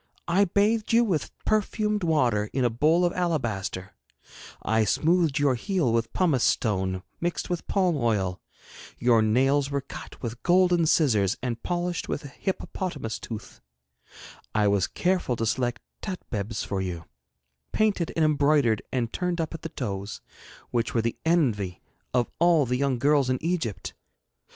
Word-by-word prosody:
I 195 +4 +4
bathed 210 +4 +1
you 235 +1 +6
with 185 -9 -1 0.2
perfumed 210 -1 0
water 120 -11 +2
in 130 -2 +1
a 120 - +2
bowl 155 +9 +3
of 175 - 0
alabaster; 115 - -2 0.7
I 110 0 +2
smoothed 160 +4 +2
your 145 -2 +3
heel 150 - 0
with 115 0 0
pumice 160 -10 +2
stone 95 -4 0 0.2
mixed 175 +1 -2
with 175 - -3
palm 185 -4 +2
oil; 100 - 0 0.6
your 120 -2 +4
nails 135 +6 +2
were 140 -1 -1
cut 135 - -10
with 120 0 -5
golden 175 -2 +4
scissors 110 - +3
and 120 -2 -3
polished 175 0 -2
with 145 - -3
a - - -7
hippopotamus 155 - -4
tooth; 110 -2 -8 0.9
I 105 -1 +3
was 100 -3 +2
careful 180 -8 0
to 115 - -2
select 120 +1 -1 0.2
tatbebs 115 - -4
for 100 -1 -2
you, 85 -3 -4 0.7
painted 205 -6 +1
and 160 - +3
embroidered 145 -6 +3
and 120 -3 -1
turned 180 -1 -1
up 160 -1 -2
at 165 - -7
the 165 - -5
toes, 100 -8 -5 0.5
which 120 0 -1
were 115 - +2
the 115 - -2
envy 115 - +1 0.3
of 125 -2 +1
all 170 -4 +4
the 125 +1 -1
young 135 -1 +1
girls 140 +1 +3
in 130 - +1
Egypt. 155 - -2
135 Hz, 155 wpm, -26 LUFS, 115-175 Hz, 0.9 s, you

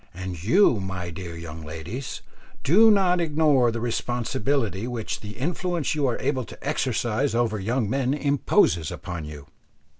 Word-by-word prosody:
And 90 -2 -6
you, 125 - +4
my 95 -2 -4
dear 85 -1 -7
young 80 -1 -8
ladies, 80 - -6 0.4
do 215 +10 +6
not 185 -4 +4
ignore 150 -6 +3
the 115 0 -3
responsibility 120 -2 -1
which 120 -3 -4
the 105 +1 -9
influence 170 +2 -1
you 145 -3 +1
are 120 - 0
able 130 -1 -1
to - - -10
exercise 120 -2 0
over 115 -3 +1
young 115 +3 0
men 135 +3 0
imposes 140 - +2
upon 85 -3 -6
you. 75 -2 -9
120 Hz, 150 wpm, -25 LUFS, 95-140 Hz, 0.4 s, do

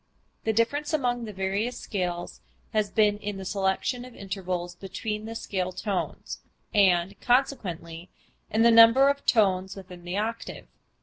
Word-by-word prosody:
The 220 - +3
difference 285 +8 0
among 245 -5 0
the 215 - -6
various 195 +5 -2
scales 175 -3 -4 0.3
has 215 -2 +1
been 210 -1 +2
in 205 -1 -4
the 190 - -7
selection 195 +6 -1
of 250 -1 -12
intervals 185 -3 -4
between 210 +4 -5
the 225 +1 -6
scale 185 -4 -2
tones, 190 +1 -4 0.3
and, 190 -3 +3
consequently, 180 -10 -1 0.4
in 220 +2 +2
the 235 - +7
number 230 +4 +8
of 280 0 -1
tones 190 -4 +2
within 180 -2 -11
the 175 +2 -4
octave. 225 +2 -4
205 Hz, 145 wpm, -27 LUFS, 185-230 Hz, 0.4 s, number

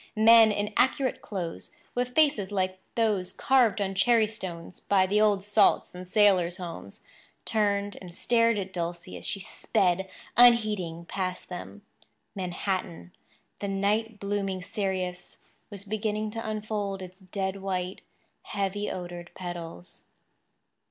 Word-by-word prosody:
Men 225 0 +8
in 205 0 -2
accurate 260 0 +2
clothes, 180 -5 -5 0.2
with 250 0 -2
faces 285 -11 +3
like 185 -1 -1 0.2
those 210 -5 +1
carved 240 -1 +3
on 195 -1 -1
cherry 225 +3 +4
stones 185 -6 -7
by 190 -2 +3
the 205 +3 +2
old 205 -3 +3
salts 205 +1 +3
in 180 0 -9
sailors' 185 -4 +3
homes, 170 - -8 0.4
turned 205 -2 0
and 175 -2 -10
stared 230 0 +2
at 190 -1 -4
Dulcie 170 0 -4
as - - -5
she 195 - -1
sped, 190 -1 0 0.3
unheeding, 210 -9 +4
past 185 0 -4
them. 185 +3 -8 0.5
Manhattan, 180 - -3 0.5
the 200 - -3
night 205 +3 0
blooming 200 -2 -2
cereus, 190 -3 -3 0.3
was 200 -2 -9
beginning 215 0 -2
to 225 0 -4
unfold 210 -3 -3
its 185 +1 -11
dead 190 0 -3
white, 185 -1 -3 0.4
heavy 200 +1 -2
odoured 175 -1 -6
petals. 170 - -8
195 Hz, 130 wpm, -28 LUFS, 185-215 Hz, 0.5 s, Men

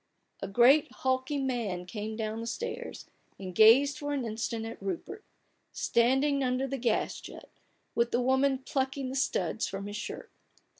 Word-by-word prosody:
" - - -48
A 195 - -3
great 245 +9 +5
hulking 260 +2 -1
man 215 -9 -2
came 215 +3 -5
down 220 0 -3
the 230 - -5
stairs, 470 - -5 0.3
and 185 -2 -7
gazed 255 +8 +6
for 290 0 -3
an 270 -4 -1
instant 225 0 -3
at 225 - -8
Rupert 195 - -5 0.3
— - - -45
standing 270 +4 +2
under 255 +1 0
the 270 0 -4
gas 235 -2 0
jet, - - -11 0.4
with 235 0 +2
the 240 - +1
woman 265 +2 +2
plucking 265 0 -2
the 260 - -5
studs 270 -4 0
from 195 +1 -5
his 205 +1 -5
shirt. - - -7
250 Hz, 170 wpm, -30 LUFS, 220-270 Hz, 0.4 s, gazed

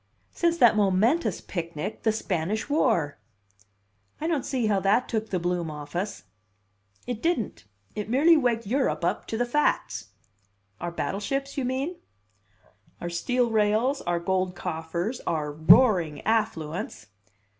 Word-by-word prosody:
"Since 340 -1 +1
that 240 -7 +6
momentous 210 - +2
picnic, 170 +1 -5
the 220 - +2
Spanish 205 0 -2
War!" 225 - +1 1.0
"I 310 - -4
don't 320 -5 0
see 255 -4 0
how 205 -2 +2
that 205 +6 +2
took 220 -1 -2
the 185 - 0
bloom 175 -1 -1
off 150 +1 -8
us." 195 +4 -3 0.8
"It 240 -2 -4
didn't. 325 - -1 0.3
It 210 0 -5
merely 300 +8 +5
waked 240 -6 +1
Europe 260 +6 0
up - - -1
to 225 - -3
the 245 - +1
facts." 240 - 0 0.7
"Our 175 - -3
battleships, 275 +11 -3
you 270 - -1
mean?" 270 +8 -2 1.0
"Our 175 - -4
steel 245 +7 0
rails, 220 +6 +2
our 175 0 -1
gold 185 0 -1
coffers, 170 +9 -3
our 150 -2 -1
roaring 160 - +5
affluence." 170 - -1
215 Hz, 135 wpm, -26 LUFS, 175-250 Hz, 1.0 s, that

